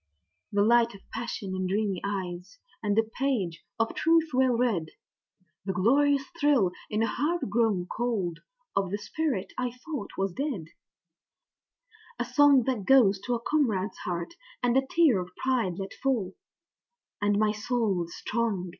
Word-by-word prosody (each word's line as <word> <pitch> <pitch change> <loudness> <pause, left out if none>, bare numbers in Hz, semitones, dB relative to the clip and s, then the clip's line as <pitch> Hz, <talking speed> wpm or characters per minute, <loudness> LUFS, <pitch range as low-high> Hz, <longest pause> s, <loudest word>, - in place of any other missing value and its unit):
The 205 0 +3
light 235 0 +4
of 195 - -16
passion 200 -5 -4
in 185 0 -1
dreamy 200 -1 -1
eyes, 190 0 -4 0.2
and 205 -1 0
a 225 - +5
page 220 -8 -2 0.2
of 225 - +1
truth 330 0 +3
well 260 0 +3
read, 210 -10 0 0.7
The 190 0 -2
glorious 275 +8 +3 0.2
thrill 280 - +4 0.2
in 215 +1 0
a - - +2
heart 315 +9 -1
grown 215 -5 +2
cold 200 -6 -2 0.4
of 195 -2 +1
the 200 - -2
spirit 245 -1 -2
I 250 -1 0 0.2
thought 290 -10 -4
was 195 -1 -1
dead, 225 - -3 1.5
A 245 - -1
song 275 +1 +5
that 245 -4 -1
goes 225 -8 +5
to 245 - +1
a - - -2
comrade's 225 -9 0
heart, 175 - -4 0.3
and 245 0 +2
a 265 0 +2
tear 300 - +4
of 180 0 -7
pride 235 -9 0
let 195 0 -5
fall 235 -9 -1 0.9
And 205 0 +2
my 215 0 +3
soul 210 -4 0
is 170 - -11
strong! 215 -6 -2
220 Hz, 155 wpm, -28 LUFS, 195-260 Hz, 1.5 s, a